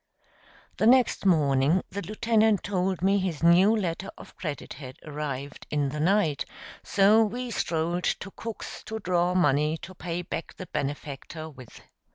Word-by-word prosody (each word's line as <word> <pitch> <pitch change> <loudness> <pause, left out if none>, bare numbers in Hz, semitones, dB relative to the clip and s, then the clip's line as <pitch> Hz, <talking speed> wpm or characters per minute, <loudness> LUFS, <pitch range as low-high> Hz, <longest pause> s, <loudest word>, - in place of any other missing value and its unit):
The 215 - +3
next 250 -5 +4
morning 150 0 +3
the 200 - -4
lieutenant 215 +1 +2
told 185 -2 -1
me 195 +1 +4
his 175 -5 -3
new 180 +6 +6
letter 190 -2 -2
of - - -13
credit 150 -6 -5
had 130 -2 -10
arrived 145 -2 -5
in 145 -2 0
the 150 +2 -5
night, 165 -3 +2 0.4
so 205 +3 +5
we 240 +3 -3
strolled 170 -2 -1
to 195 - -2
Cook's 230 +2 -7
to 220 - -4
draw 180 -3 +1
money 150 -2 +3
to 185 - -8
pay 175 0 -4
back 165 - -5
the 185 - -7
benefactor 145 +2 -5
with. 130 -5 -13
175 Hz, 155 wpm, -27 LUFS, 150-200 Hz, 0.4 s, new